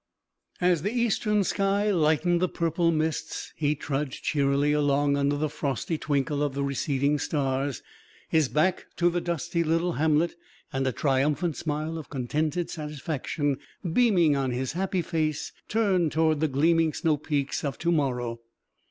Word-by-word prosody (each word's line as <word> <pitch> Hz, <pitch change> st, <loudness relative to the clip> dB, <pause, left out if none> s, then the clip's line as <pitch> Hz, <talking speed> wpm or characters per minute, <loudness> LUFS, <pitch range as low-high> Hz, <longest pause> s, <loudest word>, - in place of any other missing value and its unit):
As 180 Hz, -3 st, +3 dB
the 205 Hz, -, -1 dB
eastern 215 Hz, -3 st, +1 dB
sky 200 Hz, +2 st, +1 dB
lightened 170 Hz, 0 st, +2 dB
the 185 Hz, -, +2 dB
purple 170 Hz, 0 st, +1 dB
mists, 160 Hz, 0 st, -2 dB
he 150 Hz, -1 st, +1 dB
trudged 140 Hz, -1 st, -3 dB
cheerily 140 Hz, 0 st, +2 dB
along 145 Hz, -1 st, +2 dB
under 140 Hz, 0 st, +1 dB
the 155 Hz, +1 st, 0 dB
frosty 140 Hz, +1 st, -2 dB
twinkle 145 Hz, 0 st, 0 dB
of 145 Hz, -2 st, -1 dB
the 140 Hz, -, -1 dB
receding 140 Hz, +1 st, 0 dB
stars, 135 Hz, -2 st, -1 dB, 0.4 s
his 155 Hz, -5 st, +2 dB
back 175 Hz, +5 st, +1 dB
to 175 Hz, 0 st, +2 dB
the 175 Hz, 0 st, -1 dB
dusty 170 Hz, 0 st, -1 dB
little 165 Hz, +2 st, +1 dB
hamlet 160 Hz, +1 st, +2 dB, 0.4 s
and 135 Hz, 0 st, 0 dB
a -, -, +2 dB
triumphant 145 Hz, +5 st, +1 dB
smile 155 Hz, +1 st, -3 dB
of 155 Hz, -, -10 dB
contented 155 Hz, +6 st, -1 dB
satisfaction 150 Hz, -2 st, -3 dB, 0.3 s
beaming 180 Hz, -11 st, +4 dB
on 135 Hz, -1 st, 0 dB
his 125 Hz, +1 st, -2 dB
happy 185 Hz, +1 st, -1 dB
face, 155 Hz, -3 st, -1 dB, 0.2 s
turned 190 Hz, -7 st, +2 dB
toward 160 Hz, -1 st, +2 dB
the 155 Hz, -, +2 dB
gleaming 160 Hz, +3 st, +2 dB
snow 160 Hz, -2 st, +1 dB
peaks 145 Hz, -2 st, -2 dB
of 140 Hz, -5 st, -2 dB
to 170 Hz, +5 st, 0 dB
morrow. 125 Hz, -7 st, 0 dB
155 Hz, 150 wpm, -27 LUFS, 140-170 Hz, 0.4 s, beaming